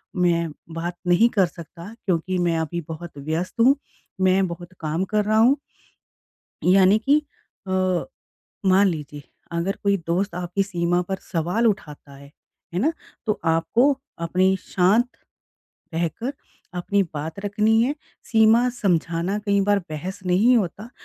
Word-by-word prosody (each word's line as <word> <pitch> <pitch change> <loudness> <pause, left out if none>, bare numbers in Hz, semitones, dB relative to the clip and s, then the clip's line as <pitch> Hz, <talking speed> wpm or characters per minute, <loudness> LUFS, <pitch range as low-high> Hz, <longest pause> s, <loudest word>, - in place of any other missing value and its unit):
मैं 170 -2 +2 0.2
बात 170 +1 -4
नहीं 175 +6 +5
कर 200 -5 +3
सकता 170 +4 -11
क्योंकि 185 0 0
मैं 170 -2 +1
अभी 160 +2 -3
बहुत 160 -1 -8
व्यस्त 160 - -3
हूँ, 265 +4 +6 0.5
मैं 185 0 +3
बहुत 175 +1 -8
काम 160 +3 -1
कर 210 +1 0
रहा 215 +1 +2
हूँ। 250 +6 +5 1.1
यानी 195 +2 +6
कि 285 +7 +3 0.4
अ, 185 -1 +1 0.6
मान 195 +2 +5
लीजिए, 150 -4 -5 0.3
अगर 170 +4 -1
कोई 200 -1 +3
दोस्त 180 +3 0
आपकी 180 +2 -1
सीमा 175 -2 0
पर 190 - -1 0.2
सवाल 180 +7 +1
उठाता 150 -9 -3
है, 140 0 -14 0.4
है 180 - 0
ना। 305 +8 +2 0.3
तो 215 -1 0
आपको 165 +9 +2 0.4
अपनी 185 +3 +2
शांत 205 +7 +3 0.9
रहकर 170 - -2 0.5
अपनी 200 +3 +1
बात 155 +5 -5
रखनी 215 +2 +2
है। 270 +5 +1 0.4
सीमा 225 +2 +5 0.2
समझाना 175 +1 +1
कई 200 0 +3
बार 205 - +4
बहस 165 +5 -5
नहीं 210 +8 +4
होता, 210 +2 -2
185 Hz, 140 wpm, -23 LUFS, 170-205 Hz, 1.1 s, हूँ